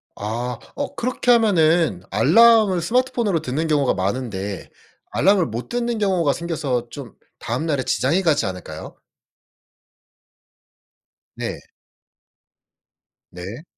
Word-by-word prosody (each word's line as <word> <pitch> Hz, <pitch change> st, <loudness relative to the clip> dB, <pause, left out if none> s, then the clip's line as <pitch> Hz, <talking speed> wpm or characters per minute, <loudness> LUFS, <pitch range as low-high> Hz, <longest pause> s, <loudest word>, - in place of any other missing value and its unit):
아 115 Hz, +3 st, -4 dB, 0.2 s
어 285 Hz, 0 st, -4 dB
그렇게 245 Hz, 0 st, 0 dB
하면은 165 Hz, -, +3 dB
알람을 220 Hz, -6 st, +5 dB
스마트폰으로 235 Hz, -4 st, 0 dB
듣는 155 Hz, +4 st, -2 dB
경우가 145 Hz, -4 st, +2 dB
많은데 100 Hz, -1 st, -4 dB, 0.4 s
알람을 190 Hz, +1 st, +3 dB
못 115 Hz, +2 st, -6 dB
듣는 240 Hz, -1 st, -2 dB
경우가 185 Hz, -8 st, +1 dB
생겨서 140 Hz, -8 st, -3 dB
좀 135 Hz, -4 st, -9 dB, 0.3 s
다음 120 Hz, +7 st, -3 dB
날에 145 Hz, -5 st, 0 dB
지장이 150 Hz, +9 st, +1 dB
가지 150 Hz, -, +2 dB
않을까요? 90 Hz, -4 st, -7 dB, 2.4 s
네. -, -, -5 dB, 1.7 s
네. 95 Hz, -, -8 dB
155 Hz, 230 characters per minute, -21 LUFS, -, 2.4 s, 알람을